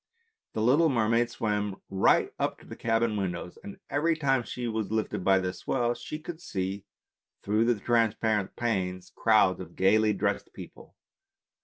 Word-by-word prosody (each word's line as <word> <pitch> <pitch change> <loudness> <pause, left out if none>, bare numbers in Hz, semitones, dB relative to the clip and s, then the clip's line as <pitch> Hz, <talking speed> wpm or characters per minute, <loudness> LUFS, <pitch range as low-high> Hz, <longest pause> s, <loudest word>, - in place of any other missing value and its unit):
The 110 - -1
little 145 +8 +4
mermaid 115 -1 +2
swam 105 -5 -2
right 95 0 +2
up - - -1
to - - -18
the - - -9
cabin 115 -1 0
windows, 90 -2 -4
and 100 - -9
every 160 +3 +1
time 135 -4 +2
she 120 0 -5
was 110 -2 -3
lifted 110 -4 -1
by 95 0 +4
the 90 -1 -1
swell 120 0 -1
she 120 +5 -7
could 160 +2 -8
see 95 - -4 0.6
through 105 +3 +2
the 120 -3 +2
trans 115 -1 +2
parent 105 -3 -1
panes 95 -6 -2
crowds 110 -4 +3
of 90 -2 -9
gaily 105 +3 +3
dressed 100 - -2
people. - - -12
110 Hz, 165 wpm, -28 LUFS, 95-120 Hz, 0.6 s, little